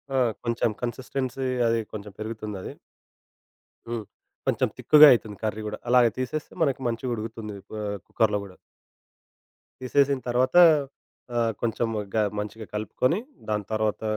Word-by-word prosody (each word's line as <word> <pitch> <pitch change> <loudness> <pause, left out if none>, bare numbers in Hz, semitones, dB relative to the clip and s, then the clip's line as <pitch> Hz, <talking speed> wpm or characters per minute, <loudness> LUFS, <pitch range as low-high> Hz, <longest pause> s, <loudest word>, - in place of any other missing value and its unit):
ఆ! - - +3 0.3
కొంచెం 115 0 +1
కన్సిస్టెన్సీ 130 +2 -3 0.2
అది 115 0 +2
కొంచెం 105 -1 -7
పెరుగుతుందది. 110 -3 -5 1.2
హ్మ్. 115 -2 -4 0.4
కొంచెం - - +2
తిక్కుగా 150 0 +8
అయితుంది 110 -4 0
కర్రీ 110 0 -2
గూడా. 105 - -4
అలాగా 120 -1 +5
తీసేస్తే 130 +4 -3
మనకి 135 -3 +1
మంచిగుడుకుతుంది 115 -3 -4 0.2
ఆహ్, 100 -1 -3
కుక్కరులో 105 -2 +1
గూడా. 95 -2 -13 1.3
తీసేసిన 140 +1 +2
తర్వాత 125 +4 +1 0.8
ఆహ్, 115 -1 +2
కొంచెం 115 0 0 0.3
గా 110 - +3 0.2
మంచిగా 105 +1 -6
కలుపుకొని 125 - 0 0.3
దాని 105 -1 0
తర్వాత... 110 -1 0
115 Hz, 120 wpm, -26 LUFS, 105-125 Hz, 1.3 s, తిక్కుగా